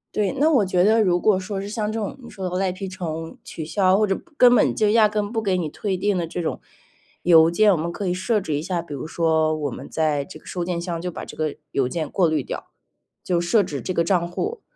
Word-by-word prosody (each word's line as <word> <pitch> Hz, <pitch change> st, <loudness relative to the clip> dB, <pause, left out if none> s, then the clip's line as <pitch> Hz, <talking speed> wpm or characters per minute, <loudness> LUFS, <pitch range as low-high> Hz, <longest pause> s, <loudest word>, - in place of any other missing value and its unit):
对， 205 Hz, -2 st, +1 dB
那 305 Hz, +3 st, +4 dB
我 260 Hz, -10 st, +4 dB
觉 180 Hz, -1 st, +1 dB
得 220 Hz, +3 st, +4 dB
如 175 Hz, -3 st, +2 dB
果 205 Hz, +1 st, +3 dB
说 195 Hz, +1 st, -4 dB
是 195 Hz, -, -5 dB
像 215 Hz, 0 st, -2 dB
这 225 Hz, -, -3 dB
种 215 Hz, +5 st, -4 dB
你 235 Hz, -, -10 dB
说 190 Hz, -2 st, -5 dB
的 180 Hz, -, -4 dB
赖 190 Hz, -1 st, +1 dB
皮 190 Hz, +2 st, -6 dB
虫， 165 Hz, -3 st, -5 dB
取 160 Hz, -, -7 dB
消， 185 Hz, +3 st, +3 dB
或 215 Hz, 0 st, +2 dB
者 195 Hz, -, +1 dB
不 340 Hz, -, -13 dB
根 245 Hz, -1 st, +7 dB
本 -, -, +3 dB
就 215 Hz, -, +2 dB
压 220 Hz, -1 st, +5 dB
根 210 Hz, -1 st, -1 dB
不 225 Hz, 0 st, -2 dB
给 195 Hz, -4 st, +1 dB
你 170 Hz, -3 st, -1 dB
退 190 Hz, +5 st, -3 dB
订 200 Hz, +1 st, 0 dB
的 175 Hz, -, -1 dB
这 165 Hz, +2 st, -4 dB
种， 165 Hz, -, -3 dB, 0.6 s
邮 165 Hz, -1 st, +6 dB
件。 215 Hz, +5 st, +4 dB
我 195 Hz, -, +5 dB
们 165 Hz, +1 st, -2 dB
可 195 Hz, +3 st, -4 dB
以 180 Hz, -, +1 dB
设 210 Hz, +4 st, 0 dB
置 170 Hz, -6 st, -4 dB
一 145 Hz, -, -1 dB
下， 175 Hz, +1 st, -2 dB
比 165 Hz, -, -9 dB
如 140 Hz, -, -5 dB
说 160 Hz, -1 st, +1 dB
我 145 Hz, -2 st, -2 dB
们 130 Hz, +2 st, -8 dB
在 150 Hz, -3 st, 0 dB
这 185 Hz, -, -12 dB
个 -, -, -26 dB
收 180 Hz, -, -4 dB
件 175 Hz, -1 st, -2 dB
箱 170 Hz, -1 st, -4 dB
就 180 Hz, +1 st, -3 dB
把 -, -, -7 dB
这 -, -, -10 dB
个 155 Hz, -2 st, -2 dB
邮 135 Hz, -, +1 dB
件 155 Hz, +1 st, -3 dB
过 180 Hz, -4 st, +2 dB
滤 155 Hz, -2 st, +1 dB
掉， -, -, -6 dB, 0.6 s
就 175 Hz, -2 st, +1 dB
设 175 Hz, +6 st, +3 dB
置 145 Hz, -9 st, -4 dB
这 185 Hz, -, -3 dB
个 170 Hz, -1 st, +1 dB
账 175 Hz, -1 st, +2 dB
户。 420 Hz, -, -4 dB
180 Hz, 295 characters per minute, -23 LUFS, 165-205 Hz, 0.6 s, 根